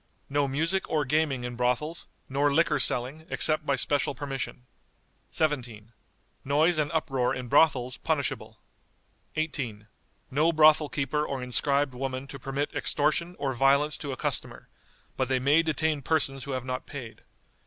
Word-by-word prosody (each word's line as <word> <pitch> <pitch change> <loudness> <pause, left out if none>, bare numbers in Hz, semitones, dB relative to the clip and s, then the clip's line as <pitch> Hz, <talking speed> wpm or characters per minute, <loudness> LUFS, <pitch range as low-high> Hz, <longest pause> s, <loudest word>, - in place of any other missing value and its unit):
No 145 0 +2
music 165 +8 0
or 150 -2 +1
gaming 140 -2 +1
in 120 0 -4
brothels, 125 +7 -1 0.2
nor 140 +2 +1
liquor 150 0 +3
selling, 135 +6 -1
except 155 -1 +1
by 140 - +3
special 140 +1 +1
permission." 135 -2 -5 0.6
"17. 120 -8 -2 0.5
Noise 155 +4 +3
and 150 0 0
uproar 135 -6 0
in 125 -1 -5
brothels 130 -3 +3
punishable." - - -2 0.8
"18. 130 -9 -3 0.5
No 155 +5 +3
brothel 155 -1 +5
keeper 150 +1 -1
or 135 -4 -3
inscribed 140 +2 +1
woman 130 +1 -4
to 135 - -8
permit 135 +2 -3
extortion 160 +4 0
or 140 -2 -1
violence 140 +4 +3
to 145 - -5
a 130 - -5
customer, - - -4 0.5
but 130 - +1
they 130 0 +1
may 140 +5 +4
detain 155 -2 0
persons 135 -3 0
who 140 - -4
have 130 -1 -3
not 130 0 -4
paid. 125 -6 -8
140 Hz, 150 wpm, -28 LUFS, 130-155 Hz, 0.8 s, brothel